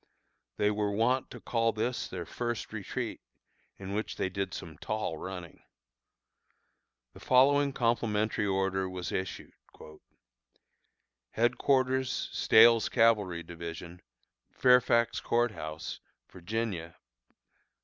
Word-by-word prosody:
They 105 0 +2
were 105 0 -1
wont 120 +5 +1
to - - -10
call 115 -1 0
this 120 +3 -2
their 90 -2 -6
first 120 +4 -4
retreat, - - -4 0.6
in 95 0 -7
which 110 +2 -3
they 95 - -1
did 95 0 -3
some 80 -4 -8
tall 105 -7 -3
running. 90 -3 -8 1.5
The - - -13
following 140 +2 +4
complimentary 110 -4 0
order 95 -1 0
was 90 -1 -5
issued: 95 -2 -4 1.8
HEADQUARTERS 130 +2 +1
STAHEL'S 115 0 +5
CAVALRY 105 -8 +2
DIVISION, 85 +1 -8 0.5
Fairfax 120 -2 +3
Court 120 0 +1
House, 80 -6 -6 0.3
Va. 95 -3 -4
105 Hz, 100 wpm, -30 LUFS, 95-120 Hz, 1.8 s, STAHEL'S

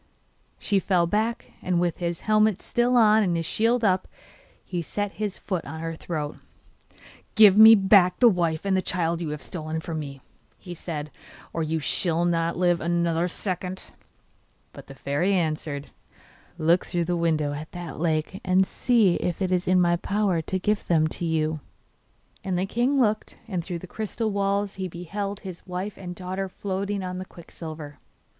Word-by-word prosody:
She 200 -2 +1
fell 180 -2 +2
back, 220 +6 -1
and 180 -1 0
with 175 -2 0
his 170 -1 -3
helmet 215 -2 +3
still 245 +1 +2
on 220 -1 +6
and 180 -4 +1
his 165 - -2
shield 230 +5 +1
up, 185 -3 +2 0.6
he 175 -2 -3
set 205 +5 -3
his 210 -2 -4
foot 185 -5 -3
on 160 +3 -7
her 165 0 -4
throat. 155 -2 -4 1.0
'Give 210 -3 +8
me 220 +1 +10
back 195 -3 +5
the 245 - +6
wife 170 -5 +1
and 195 -1 +2
the 185 - +2
child 170 -2 -1
you 165 - -3
have 150 0 -5
stolen 160 -2 -4
from 160 0 -4
me,' 140 -2 -7 0.4
he 180 - -9
said, 155 -3 -6 0.4
'or 165 - -2
you 160 0 -1
shall 170 +2 +1
not 170 -1 0
live 175 -1 +2
another 170 0 +1
second!' 185 +1 -4 0.8
But - - -12
the 135 - -11
fairy 145 +9 0
answered: 155 -4 -2 0.7
'Look 170 +3 +2
through 175 -1 -1
the 175 +1 0
window 155 -4 0
at 150 +2 -7
that 175 -3 -7
lake 160 +3 -1
and 185 +1 +3
see 220 -5 +2
if 175 -2 -2
it 190 -2 -1
is 180 0 0
in 185 0 +4
my 175 -1 +3
power 200 -2 0
to 185 +4 -2
give 210 +3 -1
them 160 -2 +3
to 170 - -4
you.' 155 -1 0 0.8
And 185 -2 -1
the 185 - 0
king 245 +7 +1
looked, 215 -3 0
and 185 -5 -3
through 175 0 -4
the 170 - -9
crystal 220 +3 -3
walls 200 0 -1
he 185 - -1
beheld 195 +4 -5
his 185 -3 -9
wife 185 +3 -4
and 180 -2 -7
daughter 185 +2 -4
floating 195 +1 -3
on 180 0 -4
the 185 - -5
quicksilver. 160 -4 -10
180 Hz, 180 wpm, -25 LUFS, 165-200 Hz, 1.0 s, me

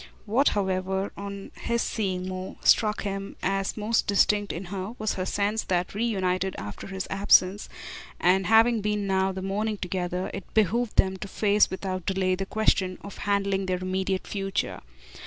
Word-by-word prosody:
What, 240 +7 +2
however, 190 0 -1
on 200 0 -7
his 235 0 0
seeing 185 -4 -2
more, 185 0 -5
struck 215 -1 +4
him 195 0 -4
as 195 +1 0
most 220 +2 +1
distinct 205 0 +3
in 175 +4 -5
her 195 +4 -4
was 215 0 -1
her 185 0 -3
sense 205 +3 0
that, 180 -1 0
reunited 190 -4 0
after 105 0 -7
his 190 -1 -4
absence 195 0 +4 0.5
and 185 +1 +3
having 225 +1 +5
been 210 0 -1
now 190 -1 +2
half 190 - -3
the 190 - -4
morning 210 +2 -1
together, 180 -1 -3
it 195 -3 -7
behooved 220 +2 +2
them 190 0 +3
to 195 - -6
face 205 +1 +3
without 185 -2 -4
delay 190 -1 +1
the 190 +1 -2
question 195 -4 +1
of 200 - -9
handling 195 -1 +1
their 185 0 0
immediate 185 +1 -2
future. 195 -1 -2
195 Hz, 170 wpm, -26 LUFS, 185-210 Hz, 0.5 s, having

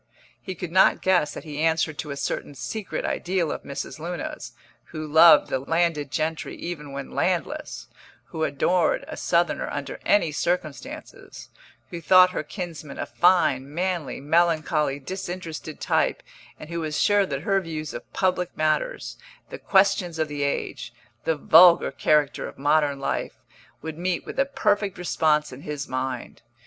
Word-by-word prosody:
He 190 -3 -6
could 175 0 -6
not 190 +2 +4
guess 180 -6 +2
that - - -7
he 150 -3 -7
answered 160 -2 +1
to 150 - -4
a 140 - -5
certain 145 - -3
secret 140 - -4
ideal 175 -3 -1
of - - -4
Mrs. 140 +2 -6
Luna's, 170 0 -6 0.3
who 155 0 -7
loved 160 +1 +6
the - - +1
landed 160 0 0
gentry 155 +5 -2
even 150 -4 -6
when 140 0 -6
landless, - - -2 0.4
who 160 - -3
adored 160 +4 +1
a - - -6
Southerner 170 -2 0
under 145 -2 -5
any 170 -6 +3
circumstances, 155 -2 -4 0.4
who 170 -1 -6
thought 185 +2 +6
her - - -2
kinsman 165 -7 -7
a - - -3
fine, 145 -7 +2
manly, 175 -2 -2
melancholy, 155 -1 +1
disinterested 175 -1 -6
type, - - 0 0.4
and 155 - -10
who 170 - -2
was 155 -2 -2
sure 205 -1 +3
that 140 -1 -4
her 195 0 +2
views 155 -3 -6
of - - -9
public 180 -1 -1
matters, 155 - -1 0.3
the - - -7
questions 190 -3 +2
of 160 -1 0
the 145 -1 -5
age, 140 0 -2 0.3
the 160 - +2
vulgar 170 +3 +6
character 150 -2 +1
of - - -11
modern 145 0 +2
life, 135 - -2 0.5
would 160 0 -6
meet 180 0 -1
with - - -6
a 275 - +4
perfect 205 -7 0
response 155 -3 +1
in 130 - -10
his 150 -1 -5
mind. 130 -1 -4
160 Hz, 160 wpm, -24 LUFS, 150-180 Hz, 0.5 s, loved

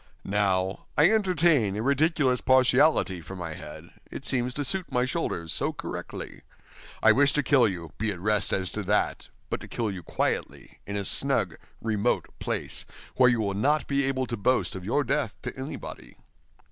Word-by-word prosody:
Now, 95 -2 0
I 150 +7 +6
entertain 170 - +3
a 110 - -2
ridiculous 140 -1 +2
partiality 130 - +3
for 95 +4 -9
my 85 -3 -5
head, - - -10 0.2
it - - -8
seems 125 -1 +1
to 145 - -1
suit 185 +6 -1
my 125 0 +2
shoulders 105 - -2
so - - 0
correctly. - - -7 0.6
I - - +8
wish 140 0 +4
to 150 - +1
kill 130 -3 +4
you, 85 -5 -5
be 110 +1 0
at 95 - -7
rest 105 0 0
as 95 -2 -1
to 105 - -3
that, 105 +2 0 0.2
but - - -1
to - - -9
kill 115 -3 -2
you 95 -2 -6
quietly - - -3
in 100 - -4
a 100 -1 -2
snug, - - +2 0.3
remote 110 +1 0
place, - - -2 0.3
where 125 -1 +6
you 120 -2 +1
will 100 -2 -1
not 145 +9 +1
be 140 0 +1
able 130 -1 0
to 120 - -3
boast 125 +5 +1
of 95 - -6
your 120 +9 +1
death 140 -7 -1
to - - -5
anybody." 130 +3 -8
120 Hz, 185 wpm, -27 LUFS, 100-140 Hz, 0.6 s, I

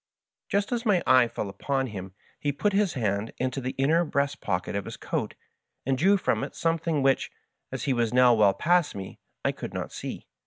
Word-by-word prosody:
Just 200 +2 0
as 235 -1 -1
my 205 -7 +2
eye 130 -2 +6
fell 110 - -4
upon 135 +7 -1
him 95 -5 -7 0.2
he 145 - 0
put 205 +8 0
his 200 -3 +2
hand 105 -3 -1
into 130 +1 -2
the 130 +1 -4
inner 155 +6 +3
breast 140 -2 -1
pocket 90 0 -2
of 100 - -2
his - - -7
coat, - - -3 0.5
and 135 +1 +2
drew 190 +9 +4
from - - 0
it - - -6
something 165 -3 0
which, 135 0 +2 0.4
as - - -4
he 135 - +1
was 120 -2 +1
now 125 -1 +6
well 105 -3 +4
past 175 - +2
me, 95 -1 -7 0.3
I - - +3
could - - -7
not - - -4
see. - - -6
135 Hz, 205 wpm, -27 LUFS, 110-165 Hz, 0.5 s, eye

